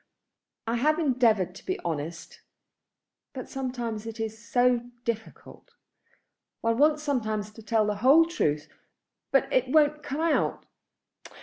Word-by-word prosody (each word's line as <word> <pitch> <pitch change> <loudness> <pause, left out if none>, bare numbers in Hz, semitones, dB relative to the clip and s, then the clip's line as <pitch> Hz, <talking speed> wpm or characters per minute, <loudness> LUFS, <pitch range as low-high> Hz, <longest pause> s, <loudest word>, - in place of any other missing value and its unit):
"I 230 +1 -1
have 305 +6 +2
endeavoured 235 - +2
to - - -13
be 370 - -3
honest; 165 +1 -5 0.9
but 255 -3 -7
sometimes 240 -5 -4
it 225 0 -7
is 220 -1 -3
so 245 0 +2 0.2
difficult. 225 -1 -6 0.9
One 230 +1 0
wants 300 +1 +3
sometimes 215 -7 -2
to 225 - -13
tell 220 0 +1
the 210 -1 -1
whole 275 +9 +6
truth, 150 - -1 0.6
but 270 - +3
it 255 0 +3
won't 300 +1 +3
come 285 +2 -4
out. 330 -1 0
240 Hz, 130 wpm, -27 LUFS, 215-280 Hz, 0.9 s, whole